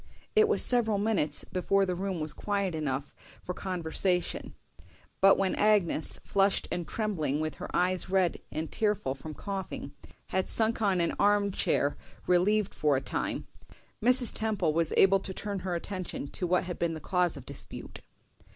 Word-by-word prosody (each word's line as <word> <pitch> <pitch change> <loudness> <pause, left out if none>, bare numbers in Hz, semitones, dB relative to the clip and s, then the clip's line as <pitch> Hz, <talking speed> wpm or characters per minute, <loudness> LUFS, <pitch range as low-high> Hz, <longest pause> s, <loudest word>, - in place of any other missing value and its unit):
It 435 0 +6
was 435 - +2
several 225 -4 +4
minutes 200 -9 0
before 195 +1 +1
the 185 - -1
room 185 0 -3
was 155 0 0
quiet 200 -3 -2
enough 145 -3 -3 0.3
for 180 - -4
conversation; 180 -1 -1 0.6
but 195 0 +6
when 195 -1 +1
Agnes, 205 -7 +2
flushed 195 0 +2
and 175 -2 -3
trembling, 170 -10 -1
with 155 0 -3
her - - -7
eyes 185 +1 +1
red 185 -3 +1
and 160 +1 -4
tearful 210 - 0
from 155 +2 -9
coughing, 190 -7 -5 0.4
had 190 0 0
sunk 225 +1 +2
on 195 -4 +2
an 170 - 0
arm 205 0 +3
chair 145 -5 +1 0.3
relieved 200 +3 +2
for 150 -2 +2
a - - -2
time, 130 - -3 0.6
Mrs. 250 +1 +3
Temple 205 -8 0
was 165 0 +2
able 195 0 +6
to 190 -1 -6
turn 200 -1 -4
her 180 -1 -3
attention 185 -3 -5
to 180 - -3
what 180 +1 +2
had 180 -1 -6
been 165 -1 0
the - - -6
cause 180 -1 0
of 130 - -10
dispute. - - -7
185 Hz, 170 wpm, -29 LUFS, 165-205 Hz, 0.6 s, It